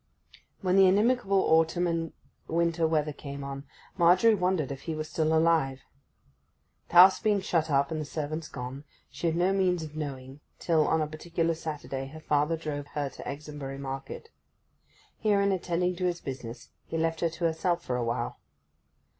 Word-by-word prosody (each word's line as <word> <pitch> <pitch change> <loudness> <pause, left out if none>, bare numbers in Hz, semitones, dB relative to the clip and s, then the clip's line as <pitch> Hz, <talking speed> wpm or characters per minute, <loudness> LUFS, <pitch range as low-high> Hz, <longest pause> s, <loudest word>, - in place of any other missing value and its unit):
When 185 -1 +2
the 195 -1 +7
inimical 210 +3 +2
autumn 165 +2 +3
and 165 -2 -1 0.4
winter 170 0 +1
weather 155 -2 0
came 140 -1 -7
on, 140 0 -6 0.3
Margery 180 +6 +6
wondered 180 -7 0
if 135 - -6
he 160 - -1
were 155 - -3
still 155 0 -1
alive. 160 -5 +2 1.1
The - - -10
house 185 +2 +9
being 210 -3 +2
shut 165 -4 0
up, 140 0 +2
and 155 -1 -2
the - - -4
servants 155 +2 -4
gone, 125 +3 -7 0.3
she 170 - -3
had 165 - +1
no 180 +3 +2
means 180 -3 +1
of 155 -1 -9
knowing, 135 -2 -6 0.2
till, 160 -3 +2
on 160 -1 +2
a - - -2
particular 165 +2 -2
Saturday, 145 -4 -5
her 155 +3 -10
father 150 +1 +1
drove 145 -3 -5
her 145 -2 -1
to - - -10
Exonbury 140 -1 -6
market. 135 - -6 0.9
Here, 210 -2 +2
in 200 0 +2
attending 180 -1 0
to 185 - -1
his 175 -1 0
business, 125 -3 -7 0.2
he 165 - -3
left 165 0 0
her 170 - +1
to 165 +2 -8
herself 170 +1 0
for 125 - -1
awhile. 120 -1 -2
160 Hz, 175 wpm, -28 LUFS, 145-175 Hz, 1.1 s, house